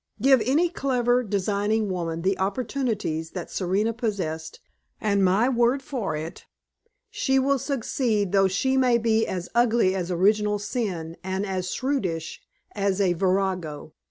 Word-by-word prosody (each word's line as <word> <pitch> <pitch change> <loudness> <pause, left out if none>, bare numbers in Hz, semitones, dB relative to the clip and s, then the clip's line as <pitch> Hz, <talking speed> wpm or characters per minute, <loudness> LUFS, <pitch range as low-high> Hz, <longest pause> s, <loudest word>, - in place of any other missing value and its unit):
Give 265 +1 +5
any 290 +9 +3
clever, 250 -6 +1
designing 205 0 0
woman 170 -3 -3
the 190 +1 +1
opportunities 205 - -2
that 180 -3 -6
Serena 200 +5 0
possessed, 185 -9 -3 0.4
and 200 -2 +1
my 195 +6 +3
word 250 +1 +2
for 230 - -3
it, 155 +2 -7 0.6
she 265 -1 +1
will 275 +1 +2
succeed 230 -6 -1
though 195 -1 +4
she 265 +8 0 0.2
be 225 -1 +1
as 180 -2 -4
ugly 235 -5 +3
as 185 -2 -3
original 210 +4 +2
sin 195 -7 -4
and 190 +2 -2
as 185 -2 -3
shrewish 190 - -2 0.3
as 200 -1 -1
a 190 -3 +3
virago. 185 -4 -1
205 Hz, 135 wpm, -25 LUFS, 185-240 Hz, 0.6 s, Give